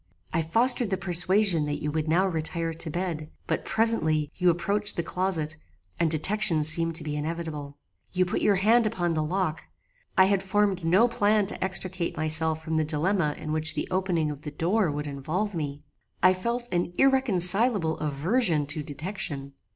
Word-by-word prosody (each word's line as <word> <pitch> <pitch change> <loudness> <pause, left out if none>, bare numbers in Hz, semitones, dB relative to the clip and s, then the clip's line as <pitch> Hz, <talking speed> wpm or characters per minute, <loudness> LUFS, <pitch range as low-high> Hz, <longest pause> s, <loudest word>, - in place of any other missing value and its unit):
I 165 - +1
fostered 235 +7 +3
the 190 - -1
persuasion 180 -1 +2
that 145 0 -3
you 150 - -3
would 155 0 -2
now 175 +5 +3
retire 165 -1 -2
to 160 0 -2
bed; 165 -2 -4 0.2
but - - -2
presently 155 -10 0
you 180 -1 +2
approached 200 +5 0
the 170 - -2
closet, 165 -4 -1 0.4
and 170 - +2
detection 170 +1 +2
seemed 165 +2 +4
to - - 0
be 150 -1 -4
inevitable. 150 -2 -5 0.3
You 185 -1 +1
put 180 - -2
your 205 - +3
hand 220 +4 +3
upon 175 -6 -1
the 155 - 0
lock. 165 0 -2 0.5
I 190 - +7
had 195 0 +1
formed 195 -1 0
no 185 +9 +4
plan 210 -3 +2
to - - -3
extricate 185 -2 -2
myself 155 0 0
from 160 0 -2
the 155 - +2
dilemma 155 +1 0
in 155 - -6
which 155 0 +1
the - - -3
opening 180 -5 0
of 145 -1 -9
the 150 - -6
door 175 +6 0
would 150 0 -4
involve 155 +9 -3
me. 145 -3 -5 0.4
I 185 - +6
felt 235 +6 -3
an 175 0 -1
irreconcilable 210 -8 +3
aversion 155 - +1
to 150 +2 -3
detection. 145 -2 -5
170 Hz, 175 wpm, -26 LUFS, 155-195 Hz, 0.5 s, I